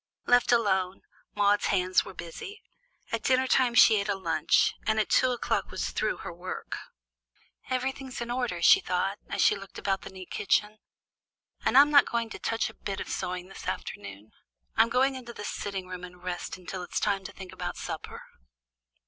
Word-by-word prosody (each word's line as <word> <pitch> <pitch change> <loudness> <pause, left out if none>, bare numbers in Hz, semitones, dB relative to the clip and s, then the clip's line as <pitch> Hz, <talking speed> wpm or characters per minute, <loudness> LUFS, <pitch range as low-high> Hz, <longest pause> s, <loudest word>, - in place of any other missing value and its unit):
Left 245 0 +4
alone, 190 -5 +2 0.3
Maude's 205 0 +3
hands 185 -1 +2
were 190 - -10
busy. 170 - -8 0.5
At - - -1
dinner 260 -1 +3
time 255 -2 +3
she 220 -3 +7
ate 200 +1 -3
a 200 - +2
lunch, 165 -5 +2
and 220 0 +2
at 215 - 0
two 255 - +5
o'clock 245 - -1
was - - -3
through - - -1
her - - -5
work. 175 +2 -6 0.9
"Everything's 260 0 -3
in 235 0 -4
order," 240 -9 -2
she 150 - +8
thought, 195 +3 -1
as - - +1
she - - +5
looked 195 -1 -10
about 195 -1 -1
the - - -8
neat 185 -1 -11
kitchen. 210 +2 +1 0.8
"And - - +3
I'm 290 +2 +8
not 285 -1 +7
going 230 -1 -1
to - - -7
touch 225 0 0
a 220 - -9
bit 200 -3 -5
of - - -6
sewing 180 0 -3
this 195 - -10
afternoon. 100 +1 -6 0.4
I'll 225 +1 +5
go 250 +2 +3
into 260 -3 -2
the 205 - -7
sitting 195 -2 -4
room 185 -1 -7
and 180 0 -11
rest 180 0 -4
until 185 0 -6
it's 180 - -3
time 200 -2 0
to - - -6
think 190 -2 -10
about - - -5
supper." - - -6
200 Hz, 190 wpm, -28 LUFS, 185-240 Hz, 0.9 s, she